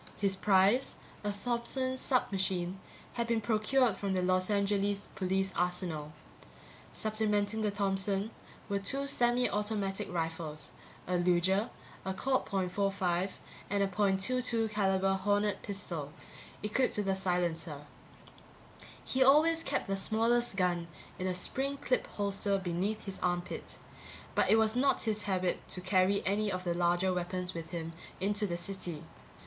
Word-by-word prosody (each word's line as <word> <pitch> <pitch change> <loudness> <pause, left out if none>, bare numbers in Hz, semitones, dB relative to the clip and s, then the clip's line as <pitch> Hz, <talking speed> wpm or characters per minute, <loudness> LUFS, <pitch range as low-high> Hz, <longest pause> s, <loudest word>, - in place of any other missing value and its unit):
His 195 -1 +2
prize, 200 +6 +3 0.3
a 205 - 0
Thompson 245 +4 -2
submachine, 190 -8 0 0.3
had 235 -1 -1
been 230 -1 +2
procured 220 +1 +2
from 200 -1 -1
the 185 -1 +1
Los 185 +1 +2
Angeles 200 0 +1
police 190 0 0
arsenal. 175 -4 -1 0.8
Supplementing 215 0 0
the 215 - +2
Thompson 200 +1 0 0.4
were 200 -1 0
two 275 +8 -1
semi 245 -2 +3
automatic 205 -2 -2
rifles, 165 -2 -4 0.3
a 180 0 0
Luger, 180 +5 +3 0.3
a 190 0 -3
Colt 260 +5 0
.45 190 -1 0 0.4
and 200 0 +2
a - - +2
.22 215 +4 +1
caliber 195 -2 +2
Hornet 205 +2 +1
pistol, 175 -8 -4 0.5
equipped 210 +4 +1
with 205 -1 -1
a 195 - +2
silencer. 170 -5 -1 1.2
He 260 - 0
always 310 +5 +6
kept - - -1
the 195 - -1
smallest 230 +3 +2
gun 175 -3 +1 0.3
in 185 - -1
a 185 - 0
spring 270 +9 -1
clip 255 -2 0
holster 200 0 -1
beneath 190 +4 -2
his 195 -2 -5
armpit, 175 -1 -2 0.6
but - - +2
it - - +7
was 220 0 +3
not 270 +3 +3
his 215 -2 0
habit 185 -2 -1
to - - 0
carry 185 +1 +2
any 205 +2 +1
of 185 -1 -3
the 175 -1 0
larger 175 +2 +2
weapons 180 +1 -2
with 165 -1 -6
him 165 -1 -5 0.3
into 205 +2 +1
the 170 -2 -2
city. 175 -3 -4
195 Hz, 140 wpm, -32 LUFS, 180-215 Hz, 1.2 s, it